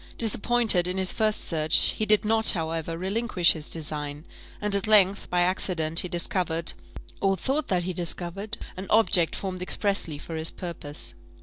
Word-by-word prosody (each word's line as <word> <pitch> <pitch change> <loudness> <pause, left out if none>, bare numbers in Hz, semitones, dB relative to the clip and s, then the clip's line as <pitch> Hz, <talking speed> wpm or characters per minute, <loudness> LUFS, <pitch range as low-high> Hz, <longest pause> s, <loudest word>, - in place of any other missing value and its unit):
Disappointed 225 -4 +3
in 180 +1 -3
his 190 -1 -1
first 215 -1 0
search, 155 -2 +2
he 215 - -3
did 215 0 +2
not, 220 +1 +6
however, 165 -1 -4
relinquish 190 -1 +2
his 155 -2 -4
design; 150 -1 -5 0.3
and 210 -1 -3
at 200 +2 +2
length, 200 -2 +3
by 175 0 +1
accident, 175 -3 +1
he - - -1
discovered, 170 -1 -1 0.5
or 195 -1 +1
thought 275 - -1
that 180 -2 -1
he 185 +1 -4
discovered, 175 +4 -2 0.2
an 190 +1 -7
object 200 -6 +4
formed 185 -2 -5
expressly 185 -4 -1
for 165 - -10
his 160 +1 -1
purpose. 150 - -7
180 Hz, 165 wpm, -25 LUFS, 165-205 Hz, 0.5 s, not